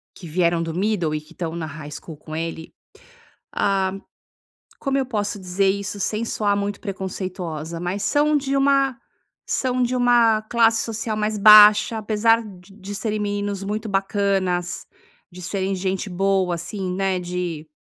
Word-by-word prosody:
que 175 - -10
vieram 170 +1 +1
do 165 -1 -3
middle 180 -5 0
e 150 - -3
que 155 - -18
estão 165 -1 -4
na 165 -2 -4
high 150 -1 -8
school 155 +2 -8
com 155 +1 -9
ele, 165 0 -5 0.8
ah, 195 -2 +1 0.9
como 275 -1 -1
eu 270 - +1
posso 210 -4 -3
dizer 190 +1 0
isso 200 +1 -2
sem 215 +4 -1
soar 205 -3 0
muito 200 0 -3
preconceituosa? 180 -5 -5
Mas 180 +4 -3
são 300 +1 +2
de 275 -1 -1
uma 275 -2 +2 0.5
são 255 -1 0
de 250 +1 0
uma 240 -3 +4
classe 225 0 +3
social 225 -1 -3
mais 215 0 -1
baixa, 210 +1 +8
apesar 225 +2 +2
de 195 -2 -13
de 200 +2 -7
serem 215 +1 -2
meninos 205 -1 -2
muito 215 +2 -3
bacanas, 195 -3 -1 0.4
de 180 +1 -11
serem 190 +2 -2
gente 190 +1 -2
boa 190 -1 +1
assim, 180 +2 -4
né, 190 -1 0
de 175 -3 -4
195 Hz, 160 wpm, -22 LUFS, 180-215 Hz, 0.9 s, baixa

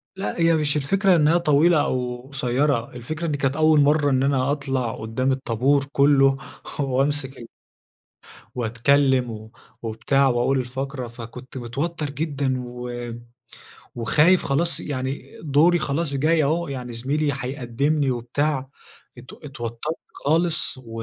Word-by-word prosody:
لا، 190 -2 -4
هي 165 0 +4
مش 150 -2 +1
الفكرة 190 +6 +3
إنها 160 +1 +4
طويلة 160 0 +4
أو 125 -2 -2
قصيرة، 130 -1 0
الفكرة 155 +8 -5
إن - - -1
كانت 135 -1 0
أول 155 0 +4
مرة 145 0 +3
إن 130 -1 +2
أنا 135 -1 +1
أطلع 135 -5 -2
قدام 115 +4 -1
الطابور 130 +2 +1
كله، 140 -1 +4 0.4
وأمسك 135 0 0
ال 115 - -10 1.1
وأتكلم 125 +2 +2
و 110 0 -9 0.3
وبتاع 115 +5 +1
وأقول 125 +1 +1
فقرة، 135 0 -5
فكنت 120 +2 -10
متوتر 145 +6 -3
جدًا 140 -3 -2
و 120 0 -6 0.9
وخايف 150 +10 +3
خلاص 165 +5 +1
يعني 135 -1 -5
دوري 160 +4 +4
خلاص 150 -1 -1
جاي 155 +3 +2
أهو، 165 +4 0
يعني 125 -3 -5
زميلي 145 +6 -1
هيقدمني 135 +2 -1
وبتاع، 130 +3 -1 0.5
ات 125 +2 -12
اتوترت 135 +1 -6 0.2
خالص 165 0 +1
و 115 -3 -8
135 Hz, 130 wpm, -23 LUFS, 125-150 Hz, 1.1 s, هي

